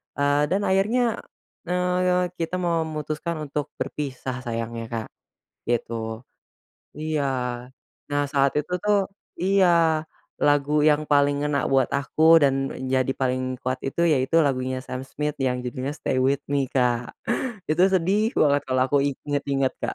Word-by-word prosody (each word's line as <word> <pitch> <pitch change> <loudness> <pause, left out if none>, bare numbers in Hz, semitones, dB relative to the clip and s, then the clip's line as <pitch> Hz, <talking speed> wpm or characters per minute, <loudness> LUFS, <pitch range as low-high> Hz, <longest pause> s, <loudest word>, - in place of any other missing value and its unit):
eee, 145 +1 +2
dan 190 +6 0
akhirnya, 225 +5 +2 0.5
eee, 180 0 +1
kita 165 +2 -2
memutuskan 160 -2 -2 0.2
untuk 145 0 -2
berpisah 130 -3 -4
sayangnya 115 0 -4
Kak, 115 -1 -4 0.6
gitu. 115 -1 -2 0.7
Iya 155 -1 -1 0.9
nah 145 0 +1
saat 140 0 +1
itu 155 +5 -3
tuh 205 -2 +2 0.3
iya 190 +1 +3 0.8
lagu 145 +1 +3
yang 150 0 +3
paling 145 0 +2
ngena 140 -3 0
buat 135 -2 +4
aku 160 +3 +4
dan 135 -1 +4 0.2
menjadi 130 0 0
paling 130 -1 -1 0.2
kuat 130 +1 -1
itu 135 +5 -1
yaitu 160 0 +3
lagunya 130 -1 -1
Sam 130 0 -6
Smith 150 +2 -4
yang 125 -2 0
judulnya 130 +3 -4
"Stay 130 - -2
with 135 +2 +2
Me" 140 -1 +1
Kak, 125 -2 0 0.6
itu 160 +3 +3
sedih 195 +4 +1
banget 145 -1 +3
kalau 130 0 +2
aku 145 - +4
inget-inget 140 -1 -1
Kak. - - -3
145 Hz, 135 wpm, -24 LUFS, 130-165 Hz, 0.9 s, buat